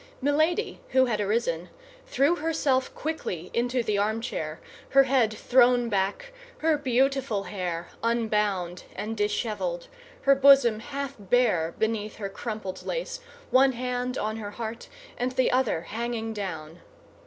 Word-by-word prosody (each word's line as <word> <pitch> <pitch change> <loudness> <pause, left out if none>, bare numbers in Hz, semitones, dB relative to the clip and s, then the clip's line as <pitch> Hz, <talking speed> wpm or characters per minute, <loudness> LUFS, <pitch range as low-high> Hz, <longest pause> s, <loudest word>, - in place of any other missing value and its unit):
Milady, 310 +8 +1
who 260 0 +6
had 215 -4 -1
arisen, 195 -5 -1 0.4
threw 345 - +2
herself 295 -4 0
quickly 185 - -4
into 245 +1 0
the 210 -3 0
armchair, 205 -7 -2 0.3
her 275 0 +6
head 260 -4 +2
thrown 245 +1 +3
back, 205 - -1 0.2
her 320 -1 +2
beautiful 265 -5 +1
hair 180 -3 -4
unbound 210 -6 0
and 220 +2 -4
disheveled, 230 - -2 0.3
her 275 +1 +6
bosom 270 -5 +6
half 275 +3 -5
bare 190 -6 +2
beneath 215 -1 -1
her 200 -2 -5
crumpled 215 -2 -6
lace, - - -3 0.3
one 265 +1 +5
hand 250 +1 -2
on 215 +1 -2
her 210 -2 -5
heart, 225 +1 -6 0.3
and 250 +1 -1
the 255 0 +2
other 250 -10 +1
hanging 225 +4 -3
down. 165 -5 -6
235 Hz, 130 wpm, -27 LUFS, 205-265 Hz, 0.4 s, who